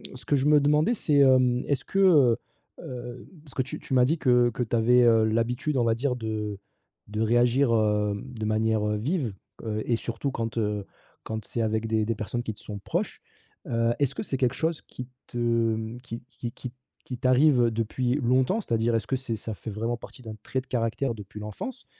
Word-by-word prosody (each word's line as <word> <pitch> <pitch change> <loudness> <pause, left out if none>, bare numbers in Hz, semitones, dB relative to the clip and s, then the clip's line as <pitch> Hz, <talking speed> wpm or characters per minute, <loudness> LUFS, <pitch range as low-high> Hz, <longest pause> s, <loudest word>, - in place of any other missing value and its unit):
ce 125 - -11
que 145 - +2
je 140 +1 +1
me 150 -1 +6
demandais 150 +10 +3
c'est, 150 -7 +1
hem, 130 -2 +4
est-ce 140 -2 -1
que, 195 - -1
heu, 150 -12 +6 0.4
heu, 125 0 -8 0.2
parce 140 - -13
que - - 0
tu 130 - -5
tu 135 - -6
m'as 125 -1 +5
dit 160 +6 +1
que 125 -3 +4
que 120 +1 -2
tu 120 0 -2
avais, 120 +2 +5
heu, 115 -2 +5
l'habitude 120 +6 0
on 120 - +3
va 115 -1 +3
dire, 125 +2 -1
de 110 -3 -3 0.5
de 105 +1 -5
réagir, 120 +3 +3
hem, 105 -2 +1
de 110 -2 -4
manière 110 0 +1
vive, 130 - -1 0.3
heu 110 -1 -2
et 120 - +2
surtout 115 +4 -3
quand, 115 -1 -4
heu, 105 -2 -1 0.4
quand 110 -1 -5
c'est 115 - -3
avec 110 0 0
des 110 -1 +1
des 115 0 -1
personnes 110 +3 -3
qui 110 - -4
te 105 - -17
sont 105 -2 -7
proches. - - -3 0.5
Heu, 115 0 +1
est-ce 140 -1 +1
que - - -3
c'est 135 - -2
quelque 125 -1 +1
chose 160 -1 -1
qui 125 - -9 0.2
te, 120 - -8
mmh, 115 0 0
qui 120 -1 -8
qui 120 -3 -6
qui 125 - -7 0.3
qui 125 - -5
t'arrive, 130 +2 +4
heu, 115 - +2
depuis 120 +3 -1
longtemps 130 - +2
c'est-à-dire, 115 - 0
est-ce 110 - -1
que 135 - 0
c'est 125 -3 -4
ça 110 +1 -5
fait 110 - -7
vraiment 115 +3 -2
partie 125 - -12
d'un 110 -1 -7
trait 130 - -2
de 130 - -23
caractère 120 +1 -1
depuis 105 0 -10
l'enfance? 105 - -7
120 Hz, 215 wpm, -26 LUFS, 110-130 Hz, 0.5 s, me